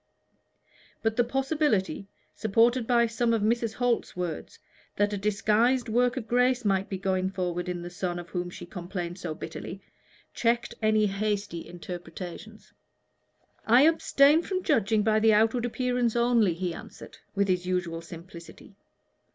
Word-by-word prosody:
But 225 -1 +1
the 240 - +3
possibility, 265 -6 0 0.3
supported 230 +3 +2
by 235 -1 +4
some 230 0 +1
of 215 - -1
Mrs. 230 0 0
Holt's 245 -6 -1
words, 175 -3 -4 0.4
that 205 +1 +1
a - - -1
disguised 220 +5 +1
work 245 +3 +2
of 230 -3 -4
grace 250 0 +2
might 195 -1 +1
be 190 - -3
going 190 0 -1
on 180 -1 -1
in 175 -1 -4
the 175 - -6
son 175 0 -3
of 175 0 -8
whom 175 -1 -3
she 175 - -9
complained 175 -1 -6
so 165 -4 -4
bitterly, 165 +4 -7 0.5
checked 235 0 0
any 215 -1 +3
hasty 200 -3 -2
interpretations. 175 +4 -9 0.9
"I 240 +4 +6
abstain 310 -1 +4
from 370 +1 -3
judging 220 -6 +2
by 215 0 +3
the 220 0 +5
outward 225 +3 +3
appearance 245 -1 0
only," 235 -6 +3
he 175 0 -3
answered, - - -11 0.2
with 200 0 +2
his 180 -1 0
usual 175 -2 -2
simplicity. 170 +2 -12
215 Hz, 150 wpm, -27 LUFS, 180-240 Hz, 0.9 s, I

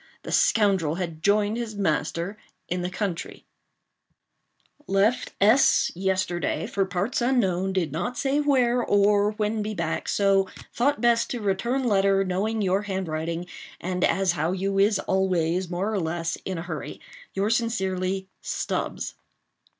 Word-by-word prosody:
The - - -6
scoundrel 190 -8 +3
had 170 -3 -5
joined 205 +3 +2
his 230 -3 -4
master 185 +2 -1 0.3
in 180 +1 -2
the 180 - -2
country: 185 -2 -4 1.4
"Left 200 +5 +1
S—— 220 +7 +5
yesterday, 185 -1 -1
for 195 -1 0
parts 195 +7 -1
unknown—did 190 - +1
not 175 - -3
say 275 +1 +1
where—or 235 -7 +3
when 210 0 -1
be 215 0 -3
back—so 195 +3 +1 0.2
thought 285 +4 +1
best 235 -1 +3
to 245 - -3
return 230 +6 0
letter, 195 -4 +3
knowing 205 +4 -1
your 190 +1 +2
handwriting, 170 -4 -3 0.3
and 180 0 -2
as 195 -2 +3
how 165 +1 -1
you 195 +1 -1
is 205 +1 +4
always, 185 -2 0
more 190 +5 -2
or 205 - 0
less, 165 0 -2
in 190 -2 -3
a 165 - -4
hurry. 165 -3 -6 0.4
"Yours 205 +4 +2
sincerely, 190 -5 -1
"STUBBS." - - -3
195 Hz, 135 wpm, -25 LUFS, 180-215 Hz, 1.4 s, S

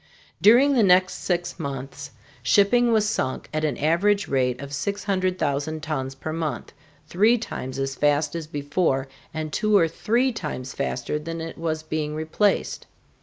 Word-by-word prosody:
During 250 +7 +6
the 250 - +4
next 185 -2 +4
six 175 -1 -2
months 140 0 -6 0.3
shipping 205 - +4
was 215 -2 +3
sunk 130 -10 -2
at 155 0 -1
an 150 -5 0
average 195 +6 +2
rate 125 -2 0
of 140 0 -8
600,000 180 -5 -1
tons 135 -4 -3
per 155 +3 -5
month, 155 -7 -3 0.4
three 215 +9 +4
times 130 - -6
as 135 0 -2
fast 145 +2 +1
as 165 -2 -5
before, 145 -2 -1 0.2
and 155 -1 -5
two 215 -1 +3
or 165 -4 +4
three 235 +10 +1
times 150 - -5
faster 140 +1 -2
than 165 +2 -5
it 165 0 -6
was 160 -1 -3
being 155 -1 -3
replaced. 160 +6 0
160 Hz, 155 wpm, -24 LUFS, 140-195 Hz, 0.4 s, During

